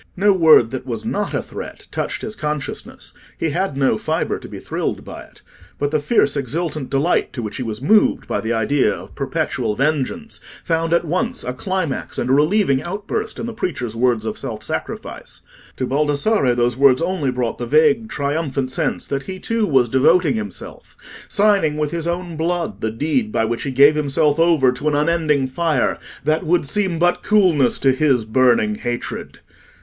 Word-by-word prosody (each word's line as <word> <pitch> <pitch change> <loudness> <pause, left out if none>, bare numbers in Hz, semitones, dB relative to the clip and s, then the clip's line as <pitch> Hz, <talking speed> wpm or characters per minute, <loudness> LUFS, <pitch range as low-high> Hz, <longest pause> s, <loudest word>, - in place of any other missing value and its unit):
No 200 +2 +4
word 160 -10 +5
that 130 - -4
was 115 -3 -4
not 205 0 -2
a - - -1
threat - - -9
touched - - -3
his 215 - -4
consciousness; 150 -4 -5 0.2
he 160 - -1
had 180 -3 -2
no 135 -1 +2
fibre - - -1
to - - -10
be - - -8
thrilled - - -4
by - - -8
it. - - -18 0.3
But 145 0 -1
the 155 - +2
fierce 145 -3 +2
exultant 150 +1 -2
delight 140 +6 +1
to 120 - -5
which 105 - -5
he - - -4
was 115 0 -5
moved 210 +7 +3
by - - -1
the 110 - -3
idea 115 +5 +2
of - - -8
perpetual 105 - -2
vengeance 155 - -1 0.2
found 165 0 0
at 170 0 +2
once 225 +10 -1
a 125 - -3
climax 185 0 -3
and 125 - -1
a - - +5
relieving 150 -1 +3
outburst 205 - -4
in - - -4
the 235 - -5
preacher's 125 - -3
words 120 -2 +1
of 110 - -4
self 115 -6 -6
sacrifice. - - -6 0.3
To 130 - -2
Baldassarre 145 - +1
those 120 0 +1
words 135 +1 +4
only 175 -6 -1
brought 125 -2 -2
the 120 - -4
vague 220 - +3
triumphant 140 -4 -2
sense - - -1
that 135 0 -4
he 190 - -4
too 225 +2 -1
was 130 -5 +3
devoting 145 +5 +3
himself—signing 150 - -1
with 150 -1 -1
his 170 -1 -2
own 170 -1 -3
blood 170 +1 -2
the 110 - 0
deed 160 - -1
by 110 - +1
which 115 +1 -2
he 140 - -3
gave 140 +3 +6
himself 150 0 +1
over 165 -6 +4
to 125 +4 -4
an 150 - +2
unending 150 -2 +1
fire, 150 0 0 0.2
that 155 +3 +1
would 170 -1 +1
seem 190 +1 0
but 175 +1 +2
coolness 180 - +3
to 135 - +3
his 130 -4 +2
burning 130 - +3
hatred. 120 - -5
150 Hz, 185 wpm, -20 LUFS, 130-175 Hz, 0.3 s, gave